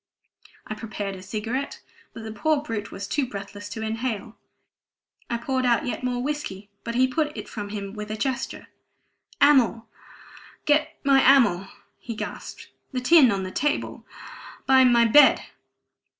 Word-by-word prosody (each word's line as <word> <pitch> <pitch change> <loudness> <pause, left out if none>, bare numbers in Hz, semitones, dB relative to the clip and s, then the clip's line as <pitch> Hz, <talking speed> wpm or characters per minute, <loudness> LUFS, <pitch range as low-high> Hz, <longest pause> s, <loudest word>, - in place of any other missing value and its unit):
I - - -5
prepared 210 -2 -5
a 185 - -10
cigarette, 230 +8 -4 0.3
but 225 - -10
the 220 - -6
poor 290 +7 0
brute 210 -8 -5
was 200 0 -6
too 275 +4 0
breathless 205 -1 -8
to 220 +1 -5
inhale. 225 0 -3 0.9
I 235 - -1
poured 260 +2 -1
out 240 -2 +2
yet 250 - -4
more 245 -1 -1
whiskey, 210 -9 -5
but 235 0 -4
he 260 +1 +4
put 300 +3 -2
it - - -6
from 205 -2 -6
him 200 -1 -6
with 210 -1 -7
a 215 - -4
gesture. 265 +2 -3 0.8
"Amyl 255 -6 +4 0.8
get 305 +1 +2
me 275 -1 +5
amyl!" 235 -10 +4 0.3
he 230 - -7
gasped. - - -7 0.2
"The 255 - -2
tin 270 +1 +6
on 195 -1 -1
the 185 - -5
table 295 +7 -2 0.6
by 265 -1 +6
my 240 -2 +5
bed." 290 +6 +6
235 Hz, 155 wpm, -25 LUFS, 210-265 Hz, 0.9 s, tin